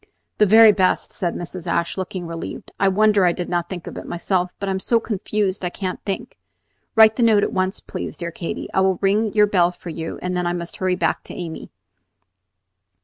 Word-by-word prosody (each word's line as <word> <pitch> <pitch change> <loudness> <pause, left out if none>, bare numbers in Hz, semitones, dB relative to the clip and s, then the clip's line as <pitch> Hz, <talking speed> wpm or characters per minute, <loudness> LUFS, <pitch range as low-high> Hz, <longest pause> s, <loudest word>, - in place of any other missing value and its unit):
"The 210 - +5
very 220 +2 +8
best," 190 -2 +1
said 175 -2 -2
Mrs. 175 0 -7
Ashe, 170 0 0
looking 185 -1 -4
relieved. 165 0 -7
"I 195 - +3
wonder 205 +1 +4
I 175 - +4
did 180 0 -5
not 175 -1 -1
think 180 -3 -6
of - - -7
it - - -10
myself, 180 +1 -1
but 200 - -3
I - - 0
am 190 - -1
so 230 +4 +2
confused 210 -2 -2
that 180 - -1
I - - -2
can't 185 0 -5
think. 220 +5 -5 0.6
Write 220 -1 +7
the - - 0
note 220 -3 +5
at - - -1
once, 185 0 -1
please, - - -6
dear 170 -1 -4
Katy. 170 0 -5
I 190 - +3
will 190 -1 +2
ring 205 +2 +2
your 210 -1 +5
bell 180 -4 +3
for 175 -1 -9
you, 160 0 -5
and 180 0 -2
then 180 -1 0
I 175 - 0
must 170 -1 -6
hurry 185 -1 0
back - - -1
to - - -9
Amy." 165 -2 -6
185 Hz, 225 wpm, -21 LUFS, 175-205 Hz, 0.6 s, very